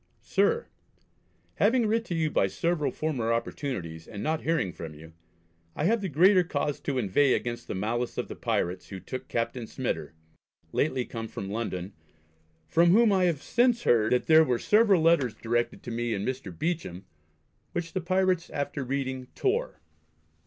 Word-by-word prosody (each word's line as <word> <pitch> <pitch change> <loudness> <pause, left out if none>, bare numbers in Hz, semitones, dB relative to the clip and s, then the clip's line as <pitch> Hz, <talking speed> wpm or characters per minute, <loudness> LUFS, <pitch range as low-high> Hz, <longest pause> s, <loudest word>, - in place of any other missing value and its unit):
SIR, 470 0 +1 0.9
Having 230 +3 +3
writ 225 +2 +1
to 175 - -3
you 160 -2 0
by 95 - +2
several 165 - 0
former 130 -8 -2
opportunities, 115 - -3
and 105 - -7
not 160 +1 0
hearing 160 - 0
from 80 -2 -8
you, 80 +2 -13 0.6
I - - -2
have 220 +6 +2
the 195 - -2
greater 180 +5 +5
cause 145 -3 -2
to 140 -2 -2
inveigh 125 +5 +3
against 120 -1 -4
the - - -4
malice 115 +5 -2
of - - -2
the - - -7
pirates 90 +2 -2
who 95 - -6
took 130 +8 -7
Captain 115 0 -2
Smyter, 80 - -4 0.6
lately 130 -4 0
come 115 -1 -6
from 100 -2 -6
London, 100 -4 -4 0.7
from 170 - +4
whom 220 +4 +5
I 185 -1 +3
have 160 -4 0
since 240 0 +2
heard 110 -2 +3
that 125 - +2
there 160 0 +7
were 125 -6 +1
several 205 - +4
letters 160 -8 +3
directed 120 +1 -1
to 120 - -6
me 115 -1 -1
and 100 +1 -3
Mr. 130 -7 -4
Beauchamp, 100 - -3 0.7
which 165 -1 -3
the 185 - -1
pirates 185 0 +1
after 145 0 -3
reading 130 -1 -3
tore. 80 - -1
135 Hz, 170 wpm, -28 LUFS, 115-170 Hz, 0.9 s, there